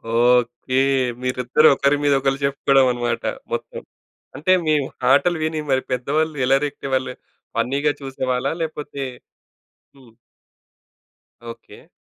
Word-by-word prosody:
Okay. 125 Hz, +2 st, +2 dB, 0.4 s
మీరిద్దరూ 125 Hz, +4 st, +2 dB
ఒకరి 140 Hz, +2 st, +2 dB
మీద 145 Hz, -1 st, +3 dB
ఒకళ్ళు 135 Hz, 0 st, 0 dB
చెప్పుకోవడం 135 Hz, -1 st, +3 dB
అనమాట 120 Hz, -1 st, -2 dB, 0.3 s
మొత్తం. -, -, -5 dB, 0.5 s
అంటే 165 Hz, +5 st, 0 dB
మీ 155 Hz, -, +2 dB, 0.4 s
ఆటలు 175 Hz, +5 st, +3 dB
విని 155 Hz, 0 st, -1 dB
మరి 130 Hz, 0 st, +2 dB
పెద్దవాళ్ళు 150 Hz, +5 st, -1 dB
ఎలా 135 Hz, +2 st, +4 dB
రియాక్ట్ 145 Hz, -, -5 dB
అయ్యేవాళ్ళు? 130 Hz, -1 st, -1 dB, 0.4 s
ఫన్నీగా 140 Hz, +3 st, +1 dB
చూసేవాళ్ళా? 130 Hz, -2 st, -2 dB
లేకపోతే 150 Hz, -3 st, -5 dB, 0.9 s
హ్మ్. 130 Hz, -4 st, -19 dB, 1.3 s
ఓకె. -, -, -12 dB
135 Hz, 110 wpm, -21 LUFS, 125-145 Hz, 1.3 s, ఎలా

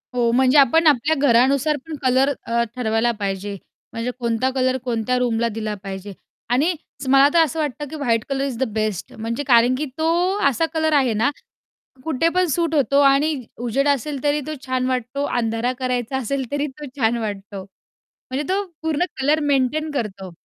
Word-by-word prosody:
हो. 235 Hz, -1 st, +2 dB
म्हणजे 260 Hz, +3 st, +4 dB
आपण 310 Hz, +4 st, +5 dB
आपल्या 295 Hz, +3 st, +3 dB
घरानुसार 275 Hz, +5 st, +3 dB
पण 315 Hz, -, -5 dB
कलर, 260 Hz, +2 st, +3 dB
अ, 235 Hz, 0 st, +1 dB
ठरवायला 230 Hz, -1 st, +1 dB
पाहिजे. 200 Hz, 0 st, -3 dB, 0.4 s
म्हणजे 230 Hz, +2 st, -3 dB
कोणता 235 Hz, +2 st, 0 dB
कलर 260 Hz, 0 st, +1 dB
कोणत्या 245 Hz, 0 st, -1 dB
रूमला 235 Hz, -1 st, +1 dB
दिला 215 Hz, -1 st, -3 dB
पाहिजे. 195 Hz, +1 st, -7 dB, 0.4 s
आणि 290 Hz, +9 st, +2 dB, 0.4 s
मला 275 Hz, +1 st, +7 dB
तर 335 Hz, -, +5 dB
असं 320 Hz, +1 st, -3 dB
वाटतं, 295 Hz, 0 st, -3 dB
की 315 Hz, -, -7 dB
white 235 Hz, -6 st, 0 dB
colour 275 Hz, 0 st, -1 dB
is 255 Hz, -4 st, -4 dB
the 265 Hz, -, 0 dB
best, 215 Hz, -4 st, -2 dB
म्हणजे 230 Hz, +5 st, -4 dB
कारण 240 Hz, +1 st, +5 dB
की 300 Hz, +3 st, -2 dB
तो 320 Hz, +1 st, +1 dB, 0.4 s
असा 325 Hz, +6 st, 0 dB
कलर 315 Hz, -1 st, +1 dB
आहे 260 Hz, -6 st, +3 dB
ना, 225 Hz, +7 st, +2 dB, 0.8 s
कुठे 320 Hz, +1 st, +1 dB
पण 365 Hz, +1 st, +1 dB
सूट 330 Hz, +1 st, 0 dB
होतो 280 Hz, 0 st, +3 dB
आणि 285 Hz, +3 st, +4 dB, 0.3 s
उजेड 275 Hz, +5 st, +1 dB
असेल 280 Hz, 0 st, -1 dB
तरी 290 Hz, +1 st, +2 dB
तो 310 Hz, -, -4 dB
छान 255 Hz, 0 st, 0 dB
वाटतो, 255 Hz, +2 st, -2 dB
अंधारा 230 Hz, +1 st, 0 dB
करायचा 250 Hz, 0 st, -2 dB
असेल 265 Hz, +2 st, -2 dB
तरी 285 Hz, +1 st, -1 dB
तो 295 Hz, -, -6 dB
छान 230 Hz, 0 st, +2 dB
वाटतो. 200 Hz, -2 st, -5 dB, 0.5 s
म्हणजे 265 Hz, +3 st, -6 dB
तो 405 Hz, +1 st, 0 dB, 0.2 s
पूर्ण 320 Hz, +2 st, 0 dB, 0.2 s
कलर 300 Hz, +3 st, +3 dB
मेंटेन 290 Hz, +2 st, +1 dB
करतो. 200 Hz, -8 st, -4 dB
260 Hz, 175 wpm, -21 LUFS, 230-290 Hz, 0.8 s, मला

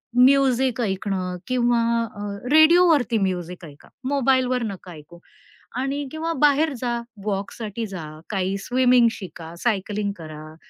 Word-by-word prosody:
Music 260 Hz, -1 st, +4 dB
ऐकणं 190 Hz, -3 st, -2 dB
किंवा 240 Hz, -2 st, +2 dB, 0.4 s
अ, 205 Hz, -, -8 dB, 0.3 s
रेडिओवरती 315 Hz, -6 st, +5 dB
म्युझिक 180 Hz, -2 st, -3 dB
ऐका. 145 Hz, -1 st, -15 dB, 0.2 s
मोबाईलवर 260 Hz, -2 st, +2 dB
नका 195 Hz, -4 st, -6 dB
ऐकू. 170 Hz, +2 st, -13 dB, 0.6 s
आणि 280 Hz, +2 st, -2 dB
किंवा 325 Hz, +1 st, -2 dB
बाहेर 295 Hz, +1 st, +4 dB
जा, 240 Hz, -1 st, -1 dB, 0.3 s
वॉकसाठी 210 Hz, +2 st, -3 dB
जा, 185 Hz, -5 st, -7 dB, 0.3 s
काही 195 Hz, -1 st, -1 dB
स्विमिंग 250 Hz, -1 st, +4 dB
शिका, 170 Hz, -4 st, -9 dB
सायकलिंग 205 Hz, -2 st, -1 dB
करा 155 Hz, -1 st, -10 dB
230 Hz, 120 wpm, -23 LUFS, 185-260 Hz, 0.6 s, रेडिओवरती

